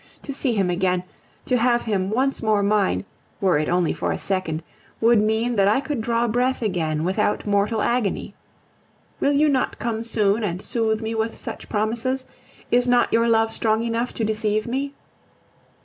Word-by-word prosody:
To 280 - -5
see 265 -2 0
him 190 -3 +1
again, 180 0 0 0.4
to 250 - +2
have 240 0 +2
him 195 -4 -1
once 260 +5 0
more 215 -3 +2
mine, 200 - +1 0.3
were 185 -6 +3
it 155 - -1
only 175 -1 +1
for - - -2
a - - -2
second, 180 -5 -2 0.4
would 230 -1 +4
mean 220 +2 0
that 195 -1 +4
I 215 +6 +3
could 275 -3 -3
draw 235 +1 +1
breath 245 +2 0
again 160 -6 -1
without 200 +4 0
mortal 205 +2 +1
agony. 235 -4 -1 0.9
Will 285 - +2
you 295 +2 +4
not 270 -3 0
come 225 -1 -2
soon 220 -1 +1
and 180 -3 -2
soothe 220 0 -1
me 220 +1 -2
with 225 0 -2
such - - -7
promises? 235 +5 -1 0.5
Is 245 +1 +3
not 245 0 +3
your 230 +1 +3
love 225 0 +2
strong 220 0 +1
enough 235 +1 -1
to 225 - -2
deceive 215 0 0
me? 275 +3 -3
220 Hz, 180 wpm, -23 LUFS, 200-240 Hz, 0.9 s, would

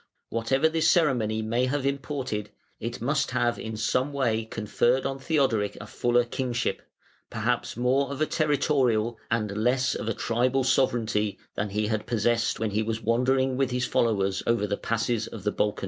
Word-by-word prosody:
Whatever 115 +7 +2
this 160 0 +2
ceremony 120 -10 +2
may 120 +4 +1
have 135 +1 -1
imported, 135 -6 -2 0.3
it 120 +1 -5
must 140 +4 +1
have 120 -2 0
in 110 -1 -5
some 130 +5 0
way 115 -6 0
conferred 115 +4 0
on 135 0 -2
Theodoric 135 -9 +1
a 105 - -8
fuller 120 +3 +1
kingship, 120 0 -2 0.5
perhaps - - -1
more 130 +3 +2
of 140 0 -5
a 155 - +3
territorial 135 -8 +1
and 105 -3 -1
less 125 +4 +1
of 110 - -4
a 115 - -1
tribal 125 +3 +1
sovereignty 115 -5 +1 0.2
than 105 0 -2
he 105 +2 -1
had 105 0 -2
possessed 115 0 +1
when 110 -1 -1
he 105 +2 +1
was 110 0 -3
wandering 130 +3 +2
with 135 -1 +1
his 125 0 0
followers 100 -6 +1
over 115 -3 +2
the 100 0 -1
passes 115 0 -1
of 105 - -9
the 105 - +1
Balkans. 105 0 0
120 Hz, 175 wpm, -26 LUFS, 110-130 Hz, 0.5 s, a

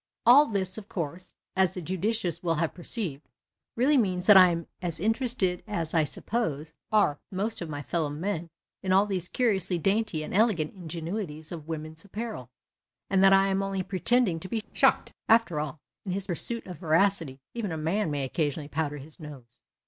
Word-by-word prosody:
All 275 +6 +8
this, 190 -1 -1
of 215 0 -14
course, 175 +1 -5 0.2
as 190 -1 +2
the - - -3
judicious 190 +2 -2
will 165 -2 0
have 165 0 -1
perceived, 175 - -1 0.5
really 275 +5 +3
means 185 -6 +1
that 210 - +8
I 185 -1 +9
am 170 -1 -2 0.2
as 170 -3 -3
interested 220 -3 0
as, 170 -7 -3
I 160 -2 +3
suppose, 160 -6 -3 0.2
are 205 -9 +3
most 200 +3 -2
of 170 - -5
my 145 -1 -5
fellow 160 0 -1
men 165 +3 -3 0.3
in 185 -1 0
all 195 +2 +5
these 185 -4 -2
curiously 195 -7 +1
dainty 195 -2 0
and - - -7
elegant 195 -7 +2
ingenuities 165 -2 -5
of 160 -3 -7
women's 160 0 -6
apparel, 205 - -6 0.6
and 195 -1 +4
that 195 - +7
I 195 0 +5
am 195 0 +1
only 195 -1 -2
pretending 195 0 +1
to 185 - -9
be 220 +1 -2
shocked. - - +2 0.2
(After 225 -9 +4
all, 150 -1 -4 0.3
in 185 - -3
his 195 0 -3
pursuit 225 +6 +2
of 180 -2 -9
veracity, 165 -4 +1
even 225 -6 -3
a 160 - -3
man 165 +5 0
may 145 -2 -2
occasionally 145 +1 -2
powder 150 -1 -2
his 145 +4 -12
nose.) 130 -7 -12
180 Hz, 185 wpm, -27 LUFS, 160-205 Hz, 0.6 s, I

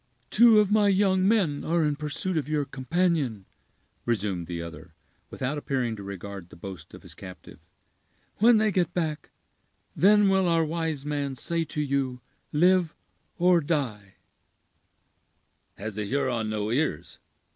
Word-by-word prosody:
"Two 230 -1 +7
of 210 -1 +2
my 210 -1 +4
young 190 -1 +3
men 190 -10 +1
are 165 0 +1
in 150 -1 0
pursuit 150 +5 -3
of 150 -2 -2
your 150 -2 0
companion," 135 - -1 0.6
resumed 100 -7 -2
the 85 -1 -4
other, 85 0 -9 0.3
without 135 +3 -3
appearing 130 -5 -2
to 105 - -9
regard 100 -2 -8
the - - -14
boast 90 -2 -9
of - - -14
his - - -12
captive; 90 -2 -12 0.8
"when 230 +2 +6
they 215 0 +2
get 180 -2 0
back, 160 -4 -2 0.7
then 205 +2 +5
will 190 -1 +3
our 165 -1 +2
wise 160 -3 -3
man 145 -2 -2
say 165 +5 -1
to 150 - -3
you 135 -3 -1 0.3
'live' 175 +1 +3 0.4
or 180 -1 +4
'die'." 125 - -3 1.6
"Has 105 +1 -6
a - - -1
Huron 125 -2 -1
no 105 0 -2
ears?" 115 - -2
145 Hz, 145 wpm, -26 LUFS, 110-175 Hz, 1.6 s, Two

